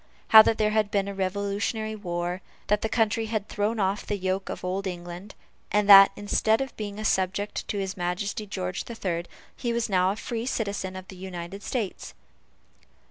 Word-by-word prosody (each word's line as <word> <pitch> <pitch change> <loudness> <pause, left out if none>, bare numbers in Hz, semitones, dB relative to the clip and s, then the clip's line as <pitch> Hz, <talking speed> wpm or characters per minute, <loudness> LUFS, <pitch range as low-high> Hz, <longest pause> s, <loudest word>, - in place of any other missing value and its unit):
How 220 - +11
that 220 +1 +2
there 215 0 +2
had 215 -1 +2
been 200 -1 0
a 200 - -4
revolutionary 200 +3 -2
war 175 -2 -3 0.3
that 210 0 +3
the 220 - -1
country 225 -1 +1
had 215 -2 -2
thrown 215 +2 -1
off 195 +1 0
the 205 - -2
yoke 190 0 -2
of - - -5
old 190 +2 -2
England 175 +2 -7 0.4
and 210 -1 +2
that, 195 -1 +10
instead 220 +2 +1
of 270 0 -4
being 205 -1 -5
a 215 - -5
subject 190 +1 0
to 205 - -3
his 190 -1 -3
Majesty 190 +4 -3
George 185 -2 -4
the 235 - -7
Third, 175 -5 -3 0.3
he 240 - -2
was 235 -1 -1
now 185 -1 +3
a 195 - -1
free 230 +2 -4
citizen 200 -6 -2
of 185 0 -8
the 190 - -9
United 180 +1 -7
States. 220 -4 -4
200 Hz, 190 wpm, -26 LUFS, 185-215 Hz, 0.4 s, How